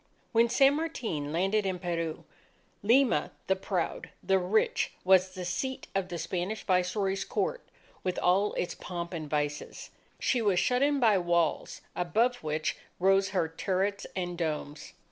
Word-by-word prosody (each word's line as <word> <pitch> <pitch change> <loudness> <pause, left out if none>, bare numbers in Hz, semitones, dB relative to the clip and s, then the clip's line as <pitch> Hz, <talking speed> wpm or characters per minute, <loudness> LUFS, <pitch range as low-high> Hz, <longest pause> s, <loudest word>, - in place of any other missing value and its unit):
When 235 0 +4
San 275 +3 +5
Martin 220 - -3
landed 195 +6 +1
in 190 -2 -1
Peru, 170 -3 -3 0.6
Lima 235 - +3 0.2
the 190 - +2
proud, 190 -2 -3
the 190 0 +3
rich, 190 +5 +1
was 185 0 +4
the 180 -1 -5
seat 260 +9 -3
of 195 -2 0
the 175 - -4
Spanish 180 +5 -3
Viceroy's 190 +1 +1
Court - - -1 0.4
with 185 -1 -1
all 195 +4 +2
its 175 - -2
pomp 175 -1 -6
and 155 -3 -5
vices. 150 0 -3 0.3
She 250 - +1
was 200 -5 +3
shut 250 +4 +2
in 285 0 +3
by 220 -6 +4
walls 170 -3 0
above 225 +8 +1
which 155 -3 -2 0.2
rose 195 +1 +4
her 185 -4 +1
turrets 190 +4 -1
and 175 -1 -3
domes. 150 -3 -4
185 Hz, 150 wpm, -29 LUFS, 175-210 Hz, 0.6 s, San